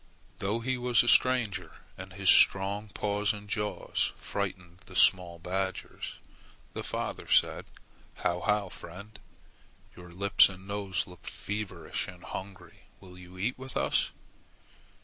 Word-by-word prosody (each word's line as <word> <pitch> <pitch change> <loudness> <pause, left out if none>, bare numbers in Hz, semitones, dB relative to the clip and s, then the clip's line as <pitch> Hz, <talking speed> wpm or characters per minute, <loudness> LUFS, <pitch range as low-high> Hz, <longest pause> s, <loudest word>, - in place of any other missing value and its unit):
Though 105 +4 -1
he 130 +1 -1
was 125 -1 +4
a - - -4
stranger 125 -6 +3 0.2
and 95 0 -9
his 95 0 -4
strong 100 +2 +5
paws 105 +2 0
and 105 -1 -9
jaws 105 +1 -1
frightened 90 -1 -4
the - - -12
small 90 -2 +4
badgers, 95 +2 -4 0.6
the - - -4
father - - -4
said, - - +3 0.5
"How, 85 - -1
how, 105 0 +1
friend! 100 +5 -10 0.8
Your 90 0 -12
lips 100 +4 +5
and 95 0 -11
nose 100 -2 -2
look 90 -1 -13
feverish 95 -6 -3
and 90 0 -11
hungry. 95 0 -9
Will 90 -1 -13
you 90 0 -13
eat 120 +8 -2
with 130 0 -5
us?" - - +2
95 Hz, 135 wpm, -30 LUFS, 90-105 Hz, 0.8 s, strong